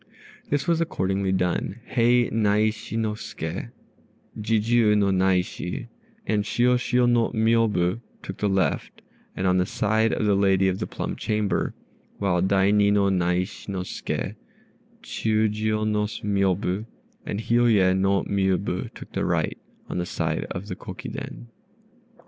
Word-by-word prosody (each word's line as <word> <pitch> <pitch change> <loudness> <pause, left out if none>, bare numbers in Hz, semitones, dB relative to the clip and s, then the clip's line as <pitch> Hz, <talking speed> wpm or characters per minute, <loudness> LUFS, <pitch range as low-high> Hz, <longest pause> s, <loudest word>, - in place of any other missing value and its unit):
This 145 -1 0
was 170 -1 +2
accordingly 95 - 0
done: 95 +3 -1
Hei 120 0 +3
Naishi 110 +1 +1
no 110 -1 0
Ske, 85 -4 -5 0.7
Jijiû 110 0 +2
no 100 -1 +3
Naishi, 95 +2 0 0.4
and 105 -1 +1
Shiôshiô 125 +2 +2
no 120 -1 +3
Miôbu 110 -3 +2 0.2
took 95 - -6
the 105 - 0
left, 95 -6 -1 0.3
on 95 0 +2
the 90 - +2
side 110 +2 +1
of - - 0
the 105 - +3
lady 95 -1 +3
of 95 0 0
the - - -3
plum - - -4
chamber; 105 -3 -1 0.4
while 95 -3 +1
Daini 100 +2 +3
no 100 -1 +3
Naishi 90 +2 -1
no 95 -2 -2
Ske, - - -4 0.7
Chiûjiô 110 0 0
no 105 -1 +1
Miôbu, 100 -1 -1 0.4
and 100 - -4
Hiôye 115 -5 +3
no 95 +1 +2
Miôbu 95 -2 -1
took - - -11
the - - -2
right, - - 0 0.3
on - - -3
the 90 - -2
side - - -2
of 90 +3 -5
the 90 - -4
Kokiden. - - -7
100 Hz, 135 wpm, -25 LUFS, 95-110 Hz, 0.7 s, Hei